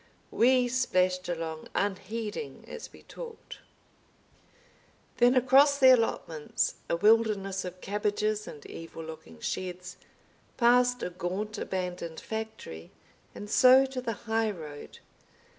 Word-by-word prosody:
We 250 +1 +4
splashed 185 -7 +1
along 165 -2 -4
unheeding 210 - -3
as - - -8
we - - -16
talked. 470 -2 -10 1.6
Then 245 +1 +5
across 270 +3 +5
the 260 -2 +8
allotments, 165 -10 -1
a - - +2
wilderness 205 -1 +2
of 180 0 -8
cabbages 210 +1 -1
and 145 - -10
evil 165 0 -9
looking 160 - -10
sheds, 180 - -5 0.6
past 245 0 +4
a 180 - -3
gaunt 195 +5 -4
abandoned 180 -3 -4
factory, 220 - -7 0.5
and 205 - -7
so 255 +5 +6
to 265 -1 -5
the 230 -2 -2
high 225 0 +1
road. 155 -7 -8
210 Hz, 115 wpm, -29 LUFS, 180-245 Hz, 1.6 s, the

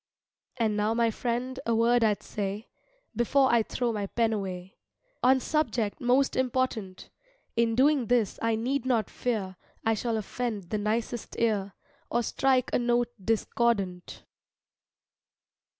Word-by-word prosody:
And 220 -3 +1
now 210 +2 +1
my 230 -1 +2
friend 245 +3 -3
a 230 - +2
word 235 +1 +3
I'd 210 -2 +1
say 205 +2 -4 0.5
Before 260 +3 +3
I 235 - +5
throw 235 +1 -2
my 205 -2 -2
pen 225 +1 +1
away, 190 -2 -5 0.4
On 260 +1 +5
subject 245 -8 -1
most 255 +2 +2
important; 250 -7 -2 0.4
In 230 -1 +2
doing 270 -1 +3
this 240 -5 +1
I 230 -1 +1
need 250 +4 -1
not 230 -5 +1
fear 200 -7 -2 0.3
I 225 - +3
shall 225 +1 -1
offend 215 -4 -4
the 215 - 0
nicest 220 +2 -2
ear, 205 -4 0 0.4
Or 240 0 +1
strike 260 +1 +1
a - - +3
note 240 0 +1
discordant. 205 -4 -1
230 Hz, 135 wpm, -28 LUFS, 210-245 Hz, 0.5 s, I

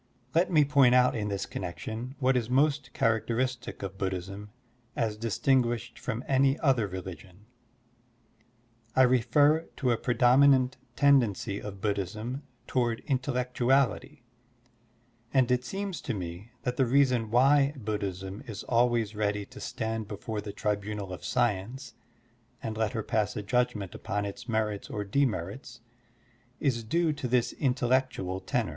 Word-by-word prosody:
Let 170 +3 +3
me 155 -4 +5
point 135 -3 +5
out 125 0 +4
in 105 -2 -2
this 100 -1 -2
connection 110 - -6
what 130 -1 +2
is 120 -2 0
most 140 +1 +2
characteristic 120 +2 -1
of 95 0 -6
Buddhism 95 +2 -4 0.5
as 110 -2 0
distinguished 120 +1 0
from 125 0 -4
any 135 +1 +3
other 130 -7 +2
religion. 95 +1 -9 1.5
I 130 - +6
refer 135 +6 +3
to 130 -4 +1
a 115 - +2
predominant 130 +1 +4 0.2
tendency 120 -8 +3
of 100 -2 -8
Buddhism 105 +6 -2 0.2
toward 120 -3 0
intellectuality, 125 -2 0 1.1
and 130 -2 +3
it 125 0 +2
seems 195 +1 -4
to 125 - -3
me 90 +3 -6
that 125 0 -2
the 130 - +3
reason 125 -3 +3
why 135 +4 +4
Buddhism 100 -3 -4
is 105 -3 -6
always 120 -3 +1
ready 105 -1 -1
to 130 +4 -13
stand 110 -1 -3
before 105 +1 -5
the 105 0 -6
tribunal 105 -2 -3
of 90 - -8
science 120 +2 -1 0.7
and 110 -1 -3
let 110 -2 -1
her 110 - -2
pass 105 -2 0
a 105 - -4
judgment 115 -4 0
upon 105 -1 -3
its 100 +3 -7
merits 110 -2 -1
or 105 - -3
demerits 120 +1 -2 0.8
is 120 -5 0
due 165 +7 +1
to 145 -3 -4
this 125 -1 +1
intellectual 125 -7 0
tenor. - - -1
120 Hz, 140 wpm, -29 LUFS, 105-130 Hz, 1.5 s, I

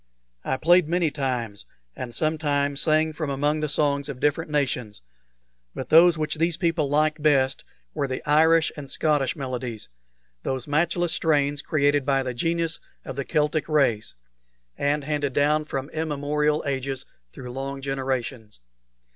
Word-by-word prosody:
I 130 - -1
played 175 +2 +4
many 170 -2 +1
times, 125 -7 -3 0.3
and 120 -2 -6
sometimes 145 -2 0
sang 155 0 +2
from 155 -1 -3
among 145 +3 0
the 155 -1 -2
songs 140 -1 +1
of 135 -3 -6
different 150 +3 0
nations; 125 - -2 0.7
but 130 - -6
those 165 +1 +7
which 155 0 -2
these 165 0 +1
people 165 -5 0
liked 155 +1 +1
best 135 -3 +2 0.3
were 140 - -1
the 130 -1 -5
Irish 160 +2 +4
and 140 -2 -8
Scottish 145 -4 +1
melodies 125 -6 -5 0.5
those 130 +1 -3
matchless 170 +3 +1
strains 145 -3 +1
created 145 -1 +2
by 135 0 +1
the 125 -1 -3
genius 165 +5 -1 0.3
of 135 - -6
the 140 - -2
Celtic 150 0 0
race, 120 - +1 0.6
and 145 +1 0
handed 145 -2 -1
down 150 +2 +2
from 135 -2 -4
immemorial 150 -1 0
ages 135 -1 -3 0.3
through 125 - -9
long 135 +2 -5
generations. 130 - -3
145 Hz, 145 wpm, -25 LUFS, 135-155 Hz, 0.7 s, those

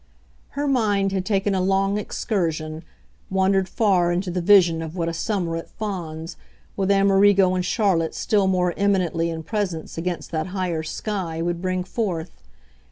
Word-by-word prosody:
Her 290 0 0
mind 205 -7 +2
had 190 -1 -2
taken 200 -1 +1
a 190 - +1
long 195 +2 +1
excursion, 165 -7 -2 0.5
wandered 190 0 +2
far 185 -6 +2
into 180 +1 -1
the 180 0 -1
vision 170 -3 +5
of 160 +1 -6
what 170 -2 -1
a 165 - -2
summer 175 -1 -2
at 165 - -7
Fawns, 170 -6 -5 0.4
with 195 -1 -1
Amerigo 195 -1 +4
and 185 -1 0
Charlotte 180 -4 +1
still 205 -3 +1
more 180 -2 +1
eminently 180 -5 +1
in 160 -1 -5
presence 180 -5 -3
against 175 0 -4
that 160 +1 -2
higher 175 -4 -1
sky, 170 0 -4
would 175 0 -2
bring 185 -1 -1
forth. 180 -5 -3
185 Hz, 160 wpm, -23 LUFS, 170-200 Hz, 0.5 s, vision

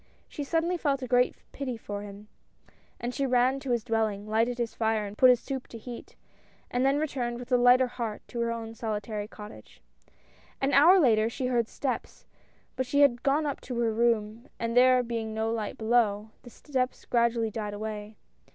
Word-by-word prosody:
She 290 - -6
suddenly 330 +4 0
felt 275 -5 -1
a - - -4
great 245 0 +3 0.2
pity 255 -4 -4
for 205 -2 -6
him, 205 +1 -10 0.7
and 240 +1 -4
she 275 0 -1
ran 255 +2 +2
to 275 -1 -7
his 240 -2 +1
dwelling, 220 -3 -1
lighted 230 +3 +1
his 235 -2 -2
fire, 220 -2 0
and 200 0 -8
put 255 +3 +6
his 250 -1 +5
soup 265 -1 -5
to 230 - -9
heat, 235 +1 -10 0.6
and 245 +1 0
then 270 +1 +3
returned 255 -6 -2
with 245 +1 -10
a - - +5
lighter 245 +1 +6
heart 235 -4 -5
to 240 - -5
her 235 0 0
own 225 -1 -5
solitary 210 -2 -4
cottage. 210 - -12 0.8
An 275 +1 0
hour 335 +8 +7
later 225 -7 +4
she 255 +2 -4
heard 240 -3 +1
steps, 265 +1 -4 0.5
but 260 -1 -2
she 285 +3 +2
had 245 -4 +4
gone 285 +3 +1
up 285 -2 -3
to 250 - -6
her 230 -2 +1
room, 230 +1 0
and 230 0 -3
there 255 0 +6
being 225 -2 -4
no 220 0 -1
light 220 -3 -3
below, 220 -2 +1
the 245 - -12
steps 255 0 -3
gradu 235 -1 +2
ally 225 -1 0
died 210 -1 -4
away. 210 0 -6
235 Hz, 195 wpm, -28 LUFS, 220-255 Hz, 0.8 s, hour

